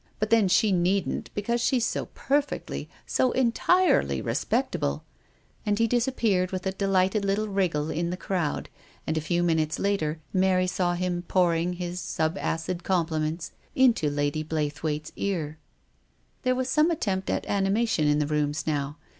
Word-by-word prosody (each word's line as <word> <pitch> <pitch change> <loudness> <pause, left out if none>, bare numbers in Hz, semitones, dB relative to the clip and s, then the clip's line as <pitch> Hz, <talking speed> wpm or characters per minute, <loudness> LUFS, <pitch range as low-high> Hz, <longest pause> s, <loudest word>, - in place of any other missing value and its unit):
But 215 +1 -2
then 225 -4 +5
she 205 +3 +3
needn't, 185 +2 0
because 235 +4 0
she's 245 -1 +2
so - - -2
per 285 +2 +2
fectly, 290 - -6 0.2
so 255 - +1
entirely 255 - +3
respectable! 70 +2 -1 0.3
" - - -36
And 205 -1 0
he 230 - +3
dis 240 +1 +1
appeared 205 -8 +1
with 185 -1 -4
a 190 - +1
delighted 195 +1 +1
little 200 +2 0
wriggle 175 -7 0
in 170 +2 -1
the 180 - -3
crowd, 175 -6 -2 0.4
and 155 - -1
a 160 - 0
few 175 +3 0
minutes 160 -2 +1
later 165 -6 0
Mary 185 -1 +3
saw 180 -1 0
him 175 0 -1
pouring 175 -1 +2
his 180 0 -4
sub 160 -1 -1 0.3
wid 180 -1 -3
compliments 160 -3 -1 0.2
into 240 - +4
Lady 145 +1 -1
Blaythewaite's 155 0 -2
ear. 160 -6 -2 0.8
There 255 -1 +1
was 255 0 -1
some 300 +5 +3
attempt 195 - -1
at - - -1
animation 200 -4 +1
in 150 0 +3
the 150 - +1
rooms 150 0 -1
now. 145 -1 -2
180 Hz, 165 wpm, -26 LUFS, 155-205 Hz, 0.8 s, then